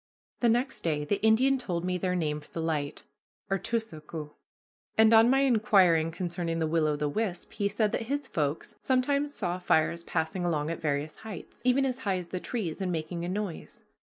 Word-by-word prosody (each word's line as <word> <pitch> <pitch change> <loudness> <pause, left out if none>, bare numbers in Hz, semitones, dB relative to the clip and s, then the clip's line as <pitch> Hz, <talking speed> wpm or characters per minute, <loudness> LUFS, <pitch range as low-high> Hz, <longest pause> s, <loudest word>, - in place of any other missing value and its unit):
The 240 - +3
next 240 +3 0
day 150 -3 -1
the 200 +6 -1
Indian 255 +5 +4
told 175 -7 -3
me 180 0 -1
their 180 0 0
name 150 -4 -1
for - - -18
the - - -6
light 155 -3 -2 0.5
artoosoqu' 165 -8 -3 0.7
and 220 0 +6
on 225 +1 +7
my 270 +1 +4
inquiring 200 -10 +4
concerning 170 0 -3
the 165 - +1
will 160 0 +2
o' 150 - +1
the 145 0 -1
wisp 185 +3 -2
he 200 -1 -1
said 210 +1 +1
that 225 - -2
his 285 +1 -1
"folks" 150 - -2
sometimes 280 +3 +1
saw 180 -2 -2
fires 170 -1 +2
passing 170 +2 -2
along 160 -3 0
at 165 - -5
various 150 0 -2
heights, 215 -6 -9
even 255 +2 +3
as 255 -1 -2
high 200 -6 0
as 175 -2 -7
the 185 - -3
trees, 195 -5 -4
and 185 -1 -1
making 170 +1 -3
a 175 - -3
noise. 195 -3 -5
180 Hz, 195 wpm, -29 LUFS, 160-225 Hz, 0.7 s, on